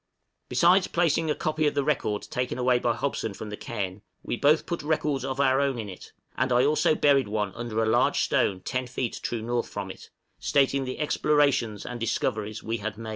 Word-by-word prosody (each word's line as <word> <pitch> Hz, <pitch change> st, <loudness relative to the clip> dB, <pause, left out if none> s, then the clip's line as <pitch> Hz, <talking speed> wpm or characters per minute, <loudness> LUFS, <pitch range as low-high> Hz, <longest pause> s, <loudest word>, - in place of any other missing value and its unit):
Besides 175 Hz, +9 st, +4 dB
placing 165 Hz, -2 st, +1 dB
a 150 Hz, -, +1 dB
copy 155 Hz, 0 st, 0 dB
of -, -, -1 dB
the 140 Hz, -, +1 dB
record 130 Hz, -8 st, 0 dB
taken 125 Hz, -1 st, -3 dB
away 125 Hz, -1 st, +3 dB
by 120 Hz, -1 st, +1 dB
Hobson 110 Hz, -7 st, -2 dB
from 105 Hz, +2 st, -7 dB
the -, -, -3 dB
cairn, 100 Hz, -3 st, -5 dB, 0.2 s
we -, -, -2 dB
both 145 Hz, +5 st, +3 dB
put 170 Hz, -, -3 dB
records 150 Hz, -2 st, 0 dB
of 135 Hz, 0 st, -3 dB
our 135 Hz, 0 st, +3 dB
own 140 Hz, -3 st, 0 dB
in 110 Hz, -3 st, -5 dB
it; 90 Hz, -, -11 dB, 0.2 s
and 130 Hz, +1 st, 0 dB
I 125 Hz, +1 st, +4 dB
also 150 Hz, +1 st, +3 dB
buried 140 Hz, -6 st, +3 dB
one 105 Hz, -2 st, -2 dB
under 115 Hz, -1 st, -2 dB
a -, -, 0 dB
large 110 Hz, -, +3 dB
stone 95 Hz, -2 st, +1 dB
ten 130 Hz, +6 st, -3 dB
feet 120 Hz, -1 st, -3 dB
true 115 Hz, -2 st, -3 dB
north 120 Hz, +1 st, -1 dB
from -, -, -5 dB
it, -, -, -13 dB, 0.3 s
stating 140 Hz, -1 st, +2 dB
the 130 Hz, -, -5 dB
explorations 145 Hz, -8 st, +1 dB
and 125 Hz, -1 st, -6 dB
discoveries 110 Hz, -1 st, -2 dB
we 115 Hz, +1 st, -2 dB
had 110 Hz, -1 st, -5 dB
made. 115 Hz, -1 st, -7 dB
125 Hz, 210 wpm, -26 LUFS, 110-145 Hz, 0.3 s, Besides